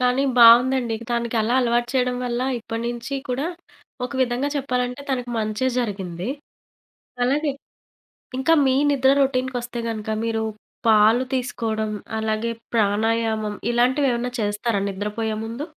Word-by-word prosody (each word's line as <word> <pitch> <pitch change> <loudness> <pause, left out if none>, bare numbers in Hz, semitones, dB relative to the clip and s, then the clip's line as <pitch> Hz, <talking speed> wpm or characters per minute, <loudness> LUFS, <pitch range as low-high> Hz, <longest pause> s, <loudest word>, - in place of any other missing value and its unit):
కానీ 250 +2 +2 0.2
బావుందండి. 240 0 +6
తనకలా 235 0 0
అలవాటు 240 0 +1
చేయడం 250 -1 +1
వల్ల 240 0 -2 0.2
ఇప్పడి 225 0 -5
నుంచి 240 +3 -5
కూడా 255 +4 -1 0.6
ఒక 250 - -5
విధంగా 250 +3 0
చెప్పాలంటే 250 -1 -2
తనకు 250 -2 -2
మంచే 215 +3 -1
జరిగింది. 190 -5 -3 1.0
అలాగే 285 +3 +1 0.9
ఇంకా 265 +5 +2
మీ 260 - +3 0.2
నిద్ర 265 -1 +3
రొటీన్‌కొస్తే 255 -2 -1
గనుక 220 -1 -4
మీరు 225 -1 -1 0.4
పాలు 220 +3 +5
తీసుకోవడం 225 -4 -2 0.3
అలాగే 220 +1 -1 0.2
ప్రాణాయామం 220 0 +1 0.2
ఇలాంటివేమన్నా 245 0 +2
చేస్తారా 205 0 -1
నిద్రపోయే 210 +3 -3
ముందు? 230 +6 -5
240 Hz, 115 wpm, -23 LUFS, 220-250 Hz, 1.0 s, బావుందండి